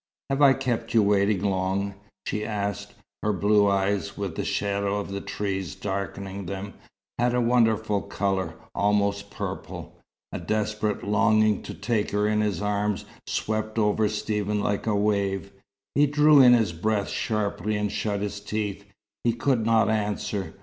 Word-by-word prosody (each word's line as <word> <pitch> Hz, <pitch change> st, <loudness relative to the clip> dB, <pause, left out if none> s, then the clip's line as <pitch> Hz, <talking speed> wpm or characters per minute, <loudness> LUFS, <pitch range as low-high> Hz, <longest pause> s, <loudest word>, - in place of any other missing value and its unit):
"Have 135 Hz, +1 st, 0 dB
I 140 Hz, -2 st, +8 dB
kept 120 Hz, -4 st, -2 dB
you 110 Hz, -, +6 dB
waiting 100 Hz, -1 st, +2 dB
long?" 95 Hz, 0 st, 0 dB, 0.3 s
she 105 Hz, -, -2 dB
asked. 100 Hz, -1 st, -3 dB, 0.3 s
Her 105 Hz, -, +1 dB
blue 100 Hz, +1 st, +3 dB
eyes, 100 Hz, 0 st, 0 dB
with 100 Hz, -5 st, -3 dB
the -, -, -2 dB
shadow 100 Hz, 0 st, -1 dB
of 100 Hz, -, -5 dB
the 100 Hz, 0 st, -3 dB
trees 95 Hz, -6 st, -3 dB
darkening 100 Hz, -1 st, -4 dB
them, 100 Hz, +1 st, -5 dB, 0.5 s
had 120 Hz, 0 st, +2 dB
a -, -, +2 dB
wonderful 110 Hz, -4 st, +2 dB
colour, 95 Hz, -5 st, -2 dB, 0.2 s
almost 100 Hz, 0 st, +1 dB
purple. 100 Hz, -, -6 dB, 0.3 s
A -, -, -4 dB
desperate 105 Hz, -1 st, -1 dB
longing 110 Hz, 0 st, +3 dB
to -, -, -8 dB
take 115 Hz, -3 st, -1 dB
her 105 Hz, +1 st, +1 dB
in 105 Hz, 0 st, +2 dB
his 105 Hz, -4 st, -1 dB
arms 105 Hz, 0 st, -1 dB, 0.2 s
swept 110 Hz, 0 st, -2 dB
over 105 Hz, 0 st, +2 dB
Stephen 105 Hz, -1 st, -1 dB
like 100 Hz, +1 st, -1 dB
a 105 Hz, -, +2 dB
wave. 100 Hz, -1 st, 0 dB, 0.4 s
He 145 Hz, +1 st, +4 dB
drew 150 Hz, 0 st, +6 dB
in 125 Hz, -1 st, +8 dB
his 110 Hz, -7 st, +3 dB
breath 100 Hz, +4 st, -1 dB
sharply 105 Hz, -1 st, -1 dB
and 105 Hz, -1 st, -1 dB
shut 105 Hz, -1 st, -2 dB
his 105 Hz, 0 st, -3 dB
teeth. 105 Hz, -1 st, -3 dB, 0.4 s
He 120 Hz, -, +2 dB
could 120 Hz, -1 st, +1 dB
not 115 Hz, -1 st, +4 dB
answer. 105 Hz, -2 st, -2 dB
105 Hz, 155 wpm, -26 LUFS, 100-110 Hz, 0.5 s, I